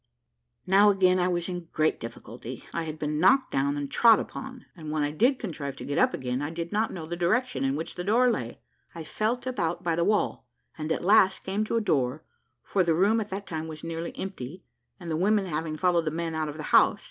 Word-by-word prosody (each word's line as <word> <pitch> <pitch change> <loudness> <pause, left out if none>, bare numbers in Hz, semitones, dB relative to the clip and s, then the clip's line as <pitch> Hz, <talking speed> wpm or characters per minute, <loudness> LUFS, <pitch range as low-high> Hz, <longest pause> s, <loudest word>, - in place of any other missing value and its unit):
Now 200 +2 +6
again 185 -2 +3
I 180 - +2
was 175 -1 -1
in 175 -2 -5
great 155 0 +1
difficulty; 115 +1 -8
I 170 -1 -2
had 155 -1 -6
been 150 -1 -2
knocked 255 - +4
down 140 +2 0
and 145 -1 -4
trod 230 -2 +6
upon, 260 -2 -7
and 155 -3 -8
when 155 -1 0
I 145 - -1
did 245 - +2
contrive 150 - -5
to - - -7
get 145 - -1
up - - +4
again, 125 +1 -3
I 145 - -2
did 170 +1 -5
not 215 +2 0
know 165 -4 -6
the 170 +2 -4
direction 175 - 0
in 135 0 +1
which 160 +2 -4
the 180 - -5
door 240 +6 +3
lay. 120 - -4 0.4
I 165 - -6
felt 220 +10 -2
about 175 -10 -2
by 170 -1 0
the 170 - +1
wall, 210 +3 0 0.3
and 155 0 -4
at 165 - -1
last 195 -1 +4
came 195 +3 -1
to 225 - -2
a 230 - +2
door, 140 - 0 0.4
for 190 - +1
the 165 -2 +2
room 205 +6 +3
at 210 - -6
that 200 +1 -5
time 160 -2 -5
was 155 -1 -9
nearly 165 0 -5
empty, 180 -3 -6 0.4
the 170 -3 -4
women 200 +4 +2
having 155 -2 -3
followed 175 -1 +2
the - - +1
men 165 +1 -3
out 155 -1 -2
of 150 - -7
the 155 - -6
house. - - +5
170 Hz, 235 wpm, -27 LUFS, 155-195 Hz, 0.4 s, Now